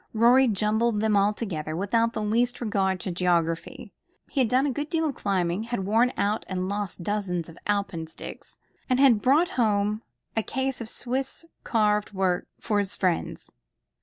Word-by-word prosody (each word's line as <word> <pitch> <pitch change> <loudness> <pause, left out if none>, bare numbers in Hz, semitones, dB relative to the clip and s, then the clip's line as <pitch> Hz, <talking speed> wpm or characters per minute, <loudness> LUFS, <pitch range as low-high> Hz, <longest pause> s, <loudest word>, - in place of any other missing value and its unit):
Rorie 245 +4 +6
jumbled 215 +1 +1
them 215 -1 +2
all 200 +1 +4
together, 160 -8 -4
without 230 +5 +1
the 215 - -2
least 240 +3 +1
regard 195 -5 0
to 190 - -3
geography. 170 -2 -1 0.4
He 280 - -1
had 240 - +2
done 255 +4 +3
a 285 - +1
good 290 +4 -4
deal 325 0 0
of 290 - -2
climbing, 190 -2 -1
had 235 -5 -3
worn 230 +5 +3
out 210 +2 0
and 185 -1 -2
lost 200 -2 -4
dozens 180 -4 -2
of 165 - -13
alpenstocks, 195 -6 -4 0.3
and 255 0 +2
had 255 -6 +5
brought 300 - +4
home 210 -1 +1 0.3
a 225 - +2
case 265 +2 -2
of 225 - -6
Swiss 265 +7 -4 0.2
carved 210 -2 +1
work 185 -2 0
for 210 -3 0
his 200 -1 -2
friends. 180 -3 -1
210 Hz, 170 wpm, -26 LUFS, 190-240 Hz, 0.4 s, Rorie